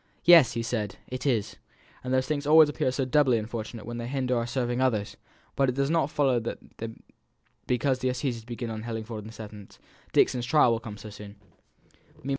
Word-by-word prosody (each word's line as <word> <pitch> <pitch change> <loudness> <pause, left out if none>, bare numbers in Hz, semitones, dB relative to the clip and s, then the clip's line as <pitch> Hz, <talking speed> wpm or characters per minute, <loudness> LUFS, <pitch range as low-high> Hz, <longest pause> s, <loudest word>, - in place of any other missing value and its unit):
"Yes!" 170 -8 +7
he 115 - -2
said, 110 -3 -3
"it 130 +2 -4
is. 115 -5 0 0.5
And 125 - -4
these 130 0 +2
things 145 -1 -2
always 155 0 +7
appear 135 -3 0
so 130 +1 -1
doubly 130 -2 +3
unfortunate 110 0 -5
when 120 +1 -5
they 120 - -4
hinder 130 -1 -1
our 115 0 -1
serving 120 0 -1
others! 110 -6 0 0.4
But 135 -1 +2
it 125 - -2
does 140 +2 0
not 165 -4 +2
follow 135 -5 +2
that 115 - -4 1.1
because 130 +1 +1
the 130 0 0
assizes 125 -2 -2
begin 120 0 -5
at 110 -1 -5
Hellingford 110 -1 -5
on 105 - -9
the - - -9
seventh, 105 -2 -11 0.3
Dixon's 120 -2 +2
trial 150 -5 +5
will 115 - 0
come 110 -2 -8
on - - -13
so 105 0 -10
soon. 105 0 -10
120 Hz, 200 wpm, -27 LUFS, 110-130 Hz, 1.1 s, Yes